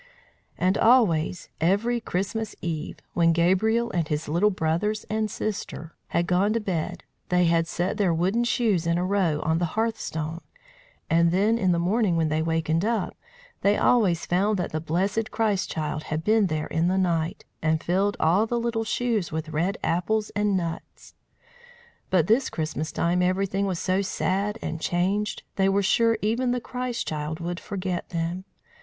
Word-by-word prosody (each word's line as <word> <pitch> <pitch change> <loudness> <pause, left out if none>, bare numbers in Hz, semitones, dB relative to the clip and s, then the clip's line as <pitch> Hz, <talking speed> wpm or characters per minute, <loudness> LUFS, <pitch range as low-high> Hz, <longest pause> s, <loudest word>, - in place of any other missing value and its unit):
And 185 +2 +1
always, 190 -9 +3
every 205 +8 +2
Christmas 210 +2 -3
eve, 160 -2 -4 0.2
when 165 -1 +3
Gabriel 215 +8 +2
and 170 -3 -1
his 150 +1 -2
little 170 +8 +3
brothers 190 +4 -1
and 215 0 0
sister 190 -6 -5
had 170 - 0
gone 185 +4 +2
to 230 - +1
bed, 180 -4 -3 0.3
they 180 0 +3
had 165 0 +2
set 175 +3 -2
their 195 -4 +2
wooden 185 +8 +1
shoes 215 -8 +1
in 170 0 +2
a 180 - 0
row 185 -6 +1
on 160 +1 +1
the 175 +3 -3
hearthstone; 165 -8 -2 0.7
and 170 +1 +4
then 210 +6 +2
in 185 -4 +2
the 170 - +2
morning 185 +1 +1
when 160 -1 +1
they 155 +1 0
wakened 160 +1 0
up, 220 -2 -1 0.5
they 200 +1 +3
always 195 -9 +3
found 200 +4 +1
that 180 - -2
the 155 - -2
blessed 195 +8 -1
Christ 215 -5 0
child 155 -1 -3
had 155 +1 -3
been 215 0 +3
there 155 -2 -2
in 165 +2 0
the 185 +1 +1
night, 170 -3 0 0.2
and 155 0 +1
filled 195 +4 +1
all 185 +8 +3
the 240 +1 0
little 230 -1 -1
shoes 225 -4 -1
with 160 0 -4
red 170 +6 -1
apples 210 +6 0
and 205 -2 +1
nuts. 170 -2 -6 1.0
But 175 -5 +3
this 230 +8 +2
Christmas 155 0 -3
time 175 +2 +1
everything 195 +2 +1
was 185 -3 -1
so 185 +3 0
sad 200 +2 -1
and 160 - -4
changed, 190 +5 0
they 195 0 +3
were 200 +1 +2
sure 230 +3 +3
even 235 +4 +1
the 250 0 +1
Christ 250 0 -4
child 155 +1 -3
would 175 +1 -4
forget 185 -3 -4
them. 170 +2 -3
185 Hz, 175 wpm, -25 LUFS, 165-210 Hz, 1.0 s, and